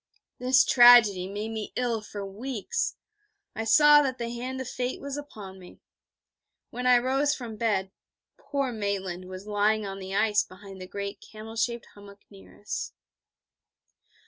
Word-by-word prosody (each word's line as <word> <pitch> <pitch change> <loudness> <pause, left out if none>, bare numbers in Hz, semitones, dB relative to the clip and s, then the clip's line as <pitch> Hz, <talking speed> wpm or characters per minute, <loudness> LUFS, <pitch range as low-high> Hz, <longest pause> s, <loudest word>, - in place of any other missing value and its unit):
This 255 +1 +4
tragedy 235 -7 +7
made 210 +3 -5
me 220 -1 -5
ill 235 -3 -1
for 205 -1 -7
weeks. 240 - -3 0.6
I 225 - -3
saw 295 +6 +7
that 260 -3 -2
the 235 -1 -4
hand 255 +2 -5
of 260 - -5
Fate 250 0 -3
was 280 0 -6
upon 210 -10 -9
me. 180 - -15 0.9
When 250 +1 -3
I 250 -1 +7
rose 270 +4 +1
from 235 -4 -7
bed, 210 -4 -1 0.4
poor 275 -2 -3
Maitland 195 -4 -3
was 185 +1 -9
lying 210 +1 +1
in 195 -1 -6
the 190 0 -6
ice 210 0 +3
behind 190 0 -13
the 185 - -8
great 200 +1 -6
camel 220 +1 -11
shaped 235 +1 -1
hummock 200 0 -15
near 95 0 -16
us. 100 - -5
220 Hz, 155 wpm, -27 LUFS, 200-250 Hz, 0.9 s, tragedy